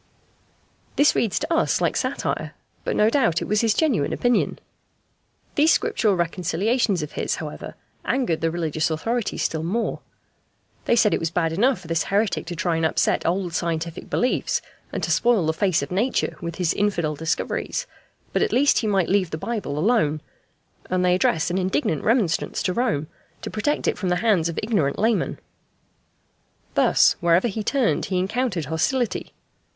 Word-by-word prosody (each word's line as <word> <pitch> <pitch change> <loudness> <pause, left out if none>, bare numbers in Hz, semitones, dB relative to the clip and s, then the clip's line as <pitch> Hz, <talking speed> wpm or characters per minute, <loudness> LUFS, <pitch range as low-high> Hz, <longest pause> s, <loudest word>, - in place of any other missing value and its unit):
This 290 - +4
reads 220 -5 0
to 315 +3 -1
us 325 - +2
like - - 0
satire, - - -2 0.3
but - - -2
no 210 - +4
doubt 230 - +2
it - - -5
was 210 0 +2
his 225 -2 +2
genuine 260 - +1
opinion. 245 0 +1 1.0
These 310 +3 +4
Scriptural 210 -4 +1
reconciliations 180 +3 0
of 150 - -6
his, - - -2
however, - - -7 0.3
angered 245 -12 0
the 165 - +1
religious 160 -2 -1
authorities 225 +8 -2
still 160 - -1
more. 205 +8 -2 0.9
They - - +3
said 220 -3 +4
it - - +1
was 165 - -1
bad 165 -1 0
enough 230 +3 +2
for 175 - -12
this 165 0 0
heretic 205 0 0
to 175 - -4
try 170 -1 0
and 165 - -1
upset 160 - +1
old 180 0 -1
scientific 165 -1 -3
beliefs, 250 - 0 0.3
and - - -4
to - - 0
spoil 235 -7 +3
the 160 - +1
face 170 -3 +1
of 140 - -7
Nature 220 +8 0
with 170 -1 -5
his 175 -3 0
infidel 170 -7 0
discoveries, 160 - -2 0.5
but - - +1
at - - +1
least 280 +3 +4
he 220 - -2
might 195 -4 +2
leave 190 -3 +2
the 155 - -4
Bible 200 -6 -3
alone; 155 -5 +2 0.7
and 180 0 +1
they 180 - +4
addressed 170 -2 +1
an 185 - 0
indignant 165 -4 0
remonstrance 210 -9 +1
to 185 - 0
Rome, 230 - 0 0.4
to - - -5
protect 255 +8 -1
it - - 0
from 185 - -1
the 180 - +2
hands 180 -5 +2
of 165 - -3
ignorant 200 -11 0
laymen. 220 -4 +1 1.4
Thus, - - +4
wherever 170 +5 +3
he 220 0 -3
turned 260 0 +1
he 185 - -2
encountered 190 - -1
hostility. 215 - -1
185 Hz, 175 wpm, -23 LUFS, 165-230 Hz, 1.4 s, This